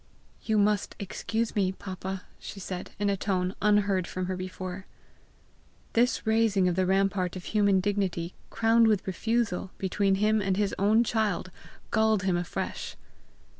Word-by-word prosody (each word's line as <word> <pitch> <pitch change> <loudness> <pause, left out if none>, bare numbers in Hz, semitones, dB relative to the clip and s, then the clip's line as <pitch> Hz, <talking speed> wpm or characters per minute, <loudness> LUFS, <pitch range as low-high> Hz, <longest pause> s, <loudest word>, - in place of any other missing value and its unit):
"You 220 -1 0
must 205 -1 +1
excuse 220 +3 -3
me, 190 -3 +2
papa!" 190 0 -6 0.2
she 200 - -8
said 185 -1 -5
in 205 +1 0
a 200 - +2
tone 185 -2 -1
unheard 205 -3 +2
from 185 0 -3
her 185 +1 -2
before. 185 0 -6 1.1
This 240 +2 +2
raising 220 -4 +3
of 180 - +1
the 185 0 +1
rampart 190 -1 +1
of 185 - -6
human 200 -2 +3
dignity, 185 -3 -1 0.2
crowned 225 0 +4
with 210 -3 +2
refusal, 205 0 -1
between 195 +1 +1
him 215 +2 +2
and 190 -1 0
his 205 -1 +1
own 215 +4 +4
child, 210 -6 -1 0.4
galled 220 -3 +3
him 190 -2 +1
afresh. 175 0 -4
195 Hz, 150 wpm, -28 LUFS, 185-215 Hz, 1.1 s, crowned